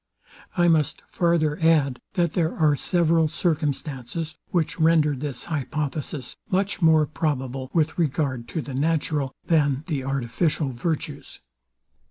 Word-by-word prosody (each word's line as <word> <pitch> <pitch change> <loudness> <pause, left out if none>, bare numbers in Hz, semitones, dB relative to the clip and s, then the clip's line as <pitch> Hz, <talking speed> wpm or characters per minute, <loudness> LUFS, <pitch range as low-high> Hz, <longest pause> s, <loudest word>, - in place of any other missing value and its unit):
I 175 0 +4
must 160 -3 +2
farther 170 -2 +1
add, 150 -6 +3
that 170 -4 +1
there 165 -2 0
are 155 -3 +4
several 165 +1 +2
circumstances, 150 -1 -2 0.2
which 170 -1 -1
render 160 -2 +4
this 135 -1 -4
hypothesis 150 -2 -3
much 195 +1 0
more 160 -2 +5
probable 135 -4 -2
with 160 0 +1
regard 135 -6 0
to 160 - -3
the 140 - -7
natural 145 -1 0
than 145 -4 +2
the 150 -6 -2
artificial 135 +3 -1
virtues. 150 +6 -4
155 Hz, 125 wpm, -24 LUFS, 140-165 Hz, 0.2 s, more